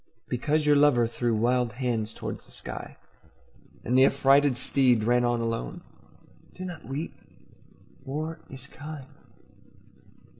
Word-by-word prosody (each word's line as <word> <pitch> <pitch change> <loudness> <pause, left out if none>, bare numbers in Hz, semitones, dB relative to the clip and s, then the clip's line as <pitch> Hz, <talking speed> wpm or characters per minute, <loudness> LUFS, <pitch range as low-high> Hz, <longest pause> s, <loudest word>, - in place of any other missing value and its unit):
Because 150 +5 0
your 150 0 +5
lover 140 -5 +5
threw 115 0 -1
wild 120 +1 +1
hands 120 -3 -1
toward - - -6
the - - -19
sky - - -8 0.9
And 125 - 0
the 130 +1 +7
affrighted 140 -1 +4
steed 125 -5 +2
ran 120 +2 +3
on 120 -1 +1
alone, 115 - -3 0.7
Do 185 - -6
not 175 -3 -8
weep. 140 +5 -4 0.9
War 155 +4 -4
is 135 0 -10
kind. 145 0 -9
130 Hz, 125 wpm, -27 LUFS, 120-145 Hz, 0.9 s, the